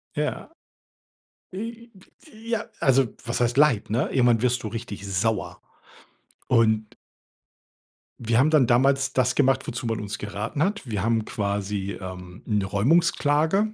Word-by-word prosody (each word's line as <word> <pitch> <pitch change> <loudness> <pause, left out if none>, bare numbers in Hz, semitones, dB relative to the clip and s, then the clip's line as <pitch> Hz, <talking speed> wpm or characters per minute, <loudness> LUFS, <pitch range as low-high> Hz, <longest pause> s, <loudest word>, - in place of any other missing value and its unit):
Ja, - - -3 1.0
wie 230 +4 -7 0.3
wie 230 -7 -14
Ja, 230 -2 -1
also, 135 -2 +3 0.2
was 115 - -2
heißt 120 +2 +1
Leid, 140 -10 +3
ne? 115 +4 0
Irgendwann 120 -3 +3
wirst 125 -1 +1
du - - -3
richtig 105 -3 -6
sauer. 100 +3 -1 0.9
Und 110 -3 +2 1.2
wir 115 +1 +1
haben 150 +4 +4
dann 145 -6 +4
damals 135 +3 +2
das 130 -1 +1
gemacht, 135 -1 +2
wozu 120 0 -4
man 115 -1 -1
uns 105 -1 -5
geraten 105 +8 -4
hat. 205 +2 -1
Wir 105 -3 -2
haben 115 -1 +1
quasi, 100 -1 -3
ähm, 90 -1 -9
'ne 105 -3 0
Räumungsklage, 160 - +2
120 Hz, 140 wpm, -24 LUFS, 105-145 Hz, 1.2 s, haben